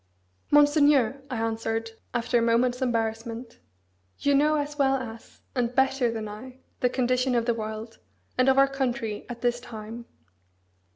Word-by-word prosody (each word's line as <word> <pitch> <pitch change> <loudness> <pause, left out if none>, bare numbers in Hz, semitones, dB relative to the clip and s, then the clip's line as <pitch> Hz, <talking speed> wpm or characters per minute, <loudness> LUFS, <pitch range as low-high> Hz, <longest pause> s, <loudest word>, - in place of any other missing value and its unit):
"Monseigneur," 290 -3 +4
I 255 - -3
answered, 225 0 -2 0.2
after 240 0 +1
a - - 0
moment's 245 +2 +2
embarrassment, 230 0 -2 0.6
"you 285 - +1
know 300 +2 +4
as 295 0 -3
well 270 -1 +4
as, 230 -4 -8
and 245 -1 -1
better 265 -2 +3
than 220 -2 -4
I, 250 +5 -9 0.2
the 250 - +2
condition 255 0 +1
of 235 -1 +1
the 235 - +2
world, 220 0 -6 0.4
and 255 +1 +4
of 265 - +4
our 275 0 +6
country, 245 -6 -3
at 235 -1 -7
this 240 -1 +1
time. 230 0 -8
245 Hz, 155 wpm, -26 LUFS, 225-265 Hz, 0.6 s, our